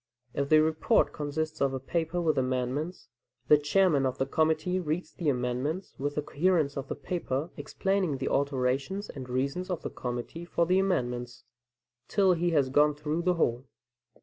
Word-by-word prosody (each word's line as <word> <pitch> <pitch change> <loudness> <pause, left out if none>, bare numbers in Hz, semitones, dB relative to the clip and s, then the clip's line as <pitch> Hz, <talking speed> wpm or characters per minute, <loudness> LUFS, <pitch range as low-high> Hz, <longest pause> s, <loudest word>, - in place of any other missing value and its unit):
If 140 0 -1
the 155 0 +6
report 160 0 +2
consists 155 +1 -3
of 135 -1 +2
a - - -3
paper 165 +5 -2
with 160 -3 +2
amendments, 130 +6 -2 0.4
the 150 - +8
chairman 150 -1 +3
of 130 - -3
the 135 - +1
committee 160 +5 +1
reads 165 +1 -3
the 165 -4 -1
amendments 130 +7 -2
with 145 +1 -2
the 150 - -1
coherence 155 -2 +1
in 140 - -2
the - - -3
paper, 160 -3 -3
explaining 190 -7 -1
the 130 - -3
alterations 140 +7 0
and 130 -2 -8
reasons 140 +9 -1
of 180 -3 -3
the - - -4
committee 125 +7 -5
for 170 0 0
the 185 +2 +3
amendments, 125 -10 -1 0.6
till 195 -3 +4
he 175 0 +1
has 145 -5 +2
gone 150 +1 +4
through 150 +3 -2
the 180 +1 +2
whole. 125 -5 0
150 Hz, 175 wpm, -29 LUFS, 135-175 Hz, 0.6 s, the